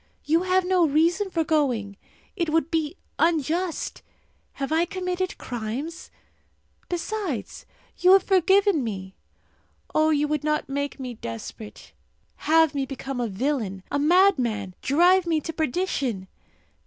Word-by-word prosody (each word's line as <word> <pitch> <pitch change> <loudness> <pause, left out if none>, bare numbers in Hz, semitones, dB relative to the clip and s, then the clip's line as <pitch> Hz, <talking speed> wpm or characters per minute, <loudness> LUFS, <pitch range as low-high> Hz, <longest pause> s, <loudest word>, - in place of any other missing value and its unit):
You 320 +3 +3
have 370 0 +2
no 360 -2 +3
reason 340 +7 +2
for 330 -3 0
going! 255 -11 0 0.4
It 340 -5 -1
would 320 0 +1
be 320 +1 -1 0.2
unjust! 330 +2 0 0.5
Have 275 +1 -4
I 325 +1 +3
committed 365 0 -3
crimes? 245 +8 -5 0.8
Besides, 355 - -4 0.3
you 365 +1 +6
have 390 -1 +6
forgiven 385 -3 +3
me. 190 -4 -5 0.8
Oh, 310 0 +3
you 300 -1 +2
would 300 -1 -1
not 305 0 0
make 285 +1 -3
me 255 -2 -5
desperate 210 - -9 0.4
have 320 -1 +3
me 275 -2 -2
become 270 -1 -5
a 240 - 0
villain, 210 -3 -2
a 285 - 0
madman, 280 - +3
drive 355 +5 +4
me 325 -2 +2
to 325 - -5
perdition? 275 - -2
310 Hz, 130 wpm, -25 LUFS, 260-355 Hz, 0.8 s, you